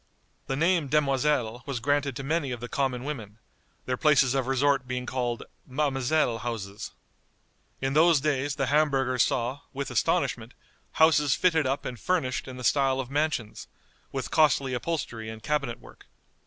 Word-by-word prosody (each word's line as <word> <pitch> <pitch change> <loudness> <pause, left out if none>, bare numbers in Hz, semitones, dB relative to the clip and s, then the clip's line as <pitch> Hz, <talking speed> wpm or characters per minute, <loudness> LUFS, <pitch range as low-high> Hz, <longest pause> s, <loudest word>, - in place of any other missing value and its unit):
The 135 - -1
name 165 +1 +2
demoiselle 135 -4 +1
was 135 -4 -2
granted 140 +1 0
to 135 - -5
many 150 0 0
of 125 -1 -4
the 120 - -6
common 130 -1 -1
women, 115 -8 -6 0.5
their 125 0 -1
places 135 -4 +4
of 135 -2 0
resort 135 0 +2
being 125 0 -3
called 120 -2 -2 0.3
"Ma'amselle 135 -2 +1
houses." 105 -4 -5 0.9
In 135 0 0
those 160 0 +5
days 140 -1 0
the 135 - 0
Hamburgers 135 -3 +2
saw, 125 +6 0
with 140 -1 -4
astonishment, 120 - 0 0.4
houses 155 -3 +4
fitted 160 -6 +2
up 135 +2 -2
and 125 -2 -5
furnished 165 - -1
in 130 -1 -8
the 125 - -7
style 135 0 +2
of 130 0 -4
mansions, 145 -7 -2 0.4
with - - -4
costly 140 -4 +3
upholstery 120 -5 -3
and 110 0 -9
cabinet 145 -6 -1
work. - - -16
135 Hz, 155 wpm, -27 LUFS, 125-150 Hz, 0.9 s, those